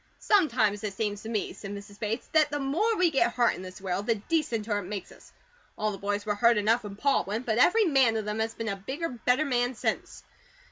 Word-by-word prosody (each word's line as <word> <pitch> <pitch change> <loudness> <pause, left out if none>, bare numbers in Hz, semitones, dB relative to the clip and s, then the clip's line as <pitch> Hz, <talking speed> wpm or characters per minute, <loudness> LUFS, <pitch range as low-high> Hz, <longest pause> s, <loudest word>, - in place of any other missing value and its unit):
"Sometimes 235 - +2
it 200 -2 -4
seems 205 -1 -2
to 225 - -7
me," 215 -3 -2
said 200 - -9
Mrs. 200 0 -11
Bates, 220 +3 -2
"that 310 -2 +4
the 290 - -2
more 340 +12 +1
we 360 -2 +3
get 240 -4 +2
HURT 240 -1 +3
in - - -8
this 185 0 -9
world 190 +1 -3
the 230 - +3
decenter 225 -4 -1
it 200 - -7
makes 195 0 -6
us. - - -17 0.5
All 215 0 0
the 195 - -7
boys 205 +1 -2
were 210 - 0
hurt 230 +2 +4
enough 220 +3 +2
when 205 -1 -7
Pa 280 +6 +2
went, 215 +5 -4
but 220 0 0
every 435 - +5
man 265 -8 +3
of 215 - -3
them 210 +1 -3
has 225 0 -2
been 225 -1 -3
a 200 - -1
BIGGER, 270 - -4
BETTER 250 +4 +1
man 245 -2 0
since. - - -3
225 Hz, 240 wpm, -28 LUFS, 205-270 Hz, 0.5 s, every